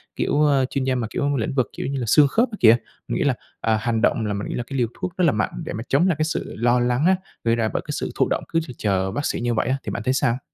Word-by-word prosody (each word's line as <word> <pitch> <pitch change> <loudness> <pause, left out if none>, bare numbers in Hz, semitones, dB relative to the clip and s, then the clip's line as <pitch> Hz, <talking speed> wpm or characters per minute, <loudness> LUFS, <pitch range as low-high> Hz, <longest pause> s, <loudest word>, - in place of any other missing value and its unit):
kiểu, 150 +1 +2
a, 135 -2 +3
chuyên 135 +1 -2
gia 130 0 +1
mà, 120 -3 -2
kiểu, 145 +3 -1
lĩnh 115 - -2
vực, 130 -3 +1
kiểu - - -3
như 135 0 -2
là, 120 - -2
xương 145 +6 +6
khớp 230 - +2
kia 210 - -6
kìa. 115 - +7 0.3
Mình - - -2
nghĩ - - +1
là, - - +3 0.3
à, 110 -1 +2
hành 115 0 0
động 115 -1 +2
là 105 - -1
mình 100 +1 -4
nghĩ - - -4
là 120 - -2
cái 135 - -4
liều 120 -2 +2
thuốc 180 -1 -4
rất 185 - +1
là 160 - +5
mạnh 105 -4 -1
để - - -4
mà 110 - -4
chống 155 +7 +3
lại 180 - +2
cái 155 - +2
sự 160 - -3
lo 120 +2 +3
lắng 125 +4 +1
á, 190 +1 +5 0.3
gây 115 0 +2
ra 115 -1 0
bởi - - -1
cái - - -4
sự - - -3
thụ - - +2
động, - - -1
cứ 165 - +1
chực 125 - -9
chờ 95 -2 0
v - - -9
bác 145 - -1
sĩ - - -1
như 120 0 0
vậy 115 - 0
á, 130 +2 +1
thì - - -4
bạn 115 - -4
thấy 130 - +1
sao? 125 -2 +1
125 Hz, 340 wpm, -23 LUFS, 115-145 Hz, 0.3 s, kìa